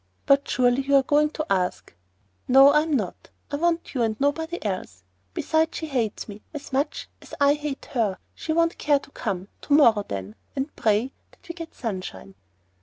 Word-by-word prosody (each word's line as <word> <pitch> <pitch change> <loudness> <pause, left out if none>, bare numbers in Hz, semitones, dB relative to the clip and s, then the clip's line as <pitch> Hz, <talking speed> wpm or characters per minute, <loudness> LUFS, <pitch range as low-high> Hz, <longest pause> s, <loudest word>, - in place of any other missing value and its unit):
"But 275 0 +4
surely 250 +1 +3
you 280 +1 +2
are 270 - +6
going 295 +2 +3
to 310 0 -4
ask——" 180 - -1 0.5
"No, 270 +2 +8
I 300 +1 +5
am 315 0 -2
not. 210 -10 -2 0.2
I 285 - -1
want 340 +1 0
you 255 - -1
and 220 -2 0
nobody 320 +5 0
else. 185 - -4 0.3
Besides, 320 +1 +1
she 320 - -4
hates 245 -8 -2
me 210 0 -9
as 285 -2 -8
much 280 +3 -1
as - - -10
I 285 0 +5
hate 295 -2 -5
her. 220 -7 0 0.2
She 320 - -5
won't 335 +1 +1
care 290 -1 +3
to 280 - -11
come. 195 -6 -4
To 285 - -1
morrow, 230 -8 +6
then; 95 +1 -5 0.2
and 275 +2 -3
pray 220 +4 +1 0.2
that - - -22
we 340 - -5
get 335 -1 -9
sunshine." 185 - -6
275 Hz, 190 wpm, -25 LUFS, 215-300 Hz, 0.5 s, No